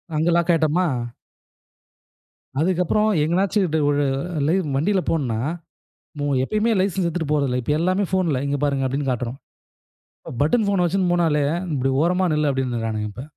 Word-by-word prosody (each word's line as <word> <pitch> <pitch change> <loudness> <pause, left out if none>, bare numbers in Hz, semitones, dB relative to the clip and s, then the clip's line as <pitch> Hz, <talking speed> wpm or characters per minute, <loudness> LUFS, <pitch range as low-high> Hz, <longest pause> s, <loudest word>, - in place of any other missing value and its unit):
அங்க 160 +3 +1
லாக் 170 0 +2
ஆயிட்டமா? 165 +3 +2 1.7
அதுக்கு 180 +2 +1
அப்பறம் 215 +5 +2
எங்கனாச்சு 190 +6 +1
டுவ் 150 -2 +2
ஒரு 145 0 +1 0.4
லை 165 - +3 0.2
வண்டியில 185 +7 +1
போணுன்னா, 125 -9 -1 1.1
எப்பயுமே 215 - 0
லைசென்ஸ் 190 -2 0
எடுத்துட்டு 165 -3 -3
போறதில்ல. 135 -4 +1
இப்ப 150 - -1
எல்லாமே 185 +4 +1
ஃபோன்ல, 170 -8 +1
இங்க 140 0 -1
பாருங்க 140 -2 0
அப்படின்னு 135 +1 -1
காட்றோம். 125 +1 -3 1.0
பட்டன் 205 +8 +2
போன 195 -3 +2
வச்சுன்போனாலே 175 -5 +1 0.3
இப்டி 135 0 0
ஓரமா 180 +2 +2
நில்லு! 150 0 +1
அப்படின்றறானுங்க 115 -5 -2
இப்ப. 125 +6 -8
160 Hz, 135 wpm, -22 LUFS, 135-185 Hz, 1.7 s, லை